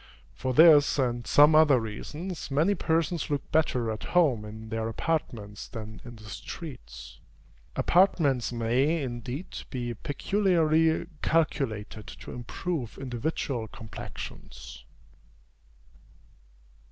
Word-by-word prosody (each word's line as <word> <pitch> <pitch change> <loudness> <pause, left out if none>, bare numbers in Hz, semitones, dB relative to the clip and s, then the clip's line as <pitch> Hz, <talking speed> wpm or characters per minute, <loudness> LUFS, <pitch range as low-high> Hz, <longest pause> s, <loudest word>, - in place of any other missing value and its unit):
For 130 - -3
this 155 -3 +7
and 120 -3 -1
some 150 +2 +6
other 150 -4 +6
reasons, 150 - -6
many 155 +8 +3
persons 165 -2 0
look 145 -1 -3
better 125 -7 +1
at 110 - -5
home 130 -11 +3
in 110 +1 -9
their 110 0 -2
apartments 115 -7 -3
than 110 -1 -8
in 120 -1 -10
the 110 - -14
streets. 105 - -9 0.6
Apartments 160 - +3
may, 130 +7 +1
indeed, 125 +6 -5
be 120 -3 -3
peculiarly 160 - +1 0.2
calculated 115 -10 -1
to - - -9
improve 125 - -4
individual 130 -2 -3
complexions. 110 0 -9
130 Hz, 105 wpm, -28 LUFS, 115-160 Hz, 0.6 s, this